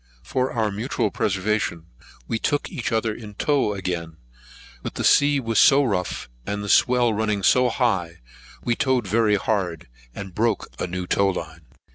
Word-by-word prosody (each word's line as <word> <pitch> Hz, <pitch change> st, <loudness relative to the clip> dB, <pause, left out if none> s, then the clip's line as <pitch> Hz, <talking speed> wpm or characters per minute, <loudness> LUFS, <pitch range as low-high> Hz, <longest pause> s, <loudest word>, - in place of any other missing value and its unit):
For 130 Hz, 0 st, -1 dB
our 110 Hz, -3 st, 0 dB
mutual 110 Hz, 0 st, -2 dB
preservation, 95 Hz, -4 st, -1 dB, 0.4 s
we 115 Hz, -, -1 dB
took 145 Hz, +4 st, -1 dB
each 125 Hz, +1 st, -3 dB
other 110 Hz, -1 st, 0 dB
in 105 Hz, -2 st, -10 dB
tow 135 Hz, -5 st, +1 dB
again; 85 Hz, -4 st, -4 dB, 0.6 s
but -, -, -6 dB
the -, -, -3 dB
sea 145 Hz, 0 st, +4 dB
was 115 Hz, -4 st, 0 dB
so 140 Hz, +1 st, +6 dB
rough, 95 Hz, -8 st, -2 dB, 0.2 s
and 105 Hz, +8 st, -4 dB
the 100 Hz, -, -5 dB
swell 120 Hz, -1 st, +4 dB
running 105 Hz, -2 st, -1 dB
so 125 Hz, +5 st, +4 dB
high, 95 Hz, -9 st, 0 dB, 0.5 s
we 120 Hz, -, +1 dB
towed 130 Hz, -3 st, +1 dB
very 105 Hz, +1 st, +2 dB
hard, 90 Hz, -6 st, -2 dB, 0.3 s
and 95 Hz, -2 st, -7 dB
broke 110 Hz, +1 st, 0 dB
a -, -, -2 dB
new 90 Hz, +1 st, -4 dB
tow 100 Hz, +2 st, +2 dB
line. 80 Hz, -4 st, -6 dB
105 Hz, 165 wpm, -23 LUFS, 95-120 Hz, 0.6 s, so